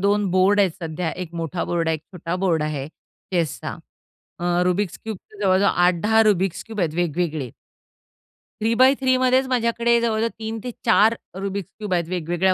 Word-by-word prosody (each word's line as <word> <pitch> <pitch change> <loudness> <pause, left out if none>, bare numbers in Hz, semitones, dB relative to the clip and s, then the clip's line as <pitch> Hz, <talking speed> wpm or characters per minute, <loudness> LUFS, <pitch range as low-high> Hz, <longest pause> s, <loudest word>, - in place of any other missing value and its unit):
2 205 +1 +2
board 190 +3 +4
आहेत 195 -2 +3
सध्या 165 0 -3
1 170 0 -15
मोठा 165 +1 -3
बोर्ड 170 -1 -1
आहे 160 - +2
1 155 - -6
छोटा 175 -1 -4
बोर्ड 165 -4 +2
आहे 150 -3 -3
चेसचा. 165 -1 -5 0.6
अ, 175 0 +1
रुबिक्स 180 +1 0
क्यूबचे 215 -1 -8
जवळजवळ 195 0 +4
8-10 180 +6 +3
रुबिक्स 195 -4 +1
क्यूब 220 -2 -6
आहेत 160 -4 0
वेगवेगळे. 160 -5 -1 1.1
3 225 +2 +2
बाय 260 +3 +6
3 260 -1 +3
मध्येच 255 +1 +3
माझ्याकडे 235 -1 +2
जवळजवळ 225 -1 +1
3-4 225 0 +1 0.3
रुबिक्स 195 -1 -4
क्यूब्स 210 -3 -3
आहेत 170 -1 0
वेगवेगळ्या 180 +1 +1
190 Hz, 160 wpm, -22 LUFS, 170-220 Hz, 1.1 s, बाय